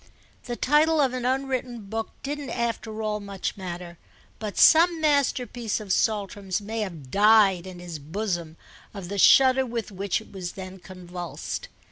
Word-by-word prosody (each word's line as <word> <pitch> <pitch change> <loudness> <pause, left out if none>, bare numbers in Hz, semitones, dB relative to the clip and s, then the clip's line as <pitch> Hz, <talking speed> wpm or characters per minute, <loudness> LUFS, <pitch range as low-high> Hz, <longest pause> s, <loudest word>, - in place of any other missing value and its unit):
The 240 - -3
title 305 +5 +3
of 270 -3 +3
an 250 -1 -3
unwritten 255 -2 -1
book 220 +2 -4
didn't 285 -1 -4
after 230 -2 -3
all 210 0 -1
much 200 -2 -4
matter, 175 -2 -7 0.4
but 210 -2 -5
some 335 +1 +6
masterpiece 255 -7 0
of 205 -3 -2
Saltram's 200 -3 0
may 220 +2 -5
have 165 -11 -5
died 200 -3 +5
in 185 -1 -9
his 175 -3 -7
bosom 170 0 -4 0.4
of 190 -3 -7
the 200 0 -3
shudder 265 +5 +6
with 235 -3 -4
which 195 0 -1
it 220 - -15
was 185 -3 -6
then 190 0 -8
convulsed. 180 -1 -7
210 Hz, 155 wpm, -25 LUFS, 185-250 Hz, 0.4 s, some